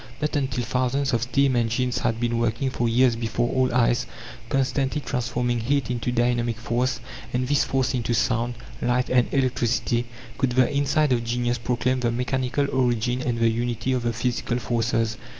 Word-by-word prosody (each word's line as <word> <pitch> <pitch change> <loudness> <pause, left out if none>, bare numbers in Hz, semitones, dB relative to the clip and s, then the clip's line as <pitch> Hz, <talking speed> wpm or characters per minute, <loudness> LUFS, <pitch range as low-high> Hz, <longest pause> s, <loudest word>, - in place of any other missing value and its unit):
Not 150 +1 -1
until 130 -4 -1
thousands 130 +3 0
of 115 - +2
steam 130 +2 +2
engines 120 +1 0
had 115 - -1
been 120 -1 0
working 120 +3 0
for 120 -2 0
years 120 +1 +4
before 115 +1 -1
all 130 -1 +2
eyes, 120 0 +2 0.4
constantly 135 +1 0
transforming 120 -2 -1
heat 130 +1 0
into 125 0 -2
dynamic 120 -1 +1
force, 120 +3 -1 0.3
and 125 +1 0
this 145 +1 +3
force 130 0 0
into 120 -1 0
sound, 115 +1 0 0.3
light, 125 +1 +1
and 125 -1 +3
electricity, 120 -2 0 0.3
could 130 -2 +1
the 130 +2 +3
insight 145 0 +2
of 120 -1 0
genius 120 +1 -1
proclaim 125 +2 0
the 120 -1 0
mechanical 130 +3 0
origin 125 -1 +1
and 120 -2 -1
the 115 0 +3
unity 120 +2 -1
of 125 - 0
the 120 0 0
physical 120 +1 -1
forces. 115 -2 0
125 Hz, 170 wpm, -24 LUFS, 120-130 Hz, 0.4 s, years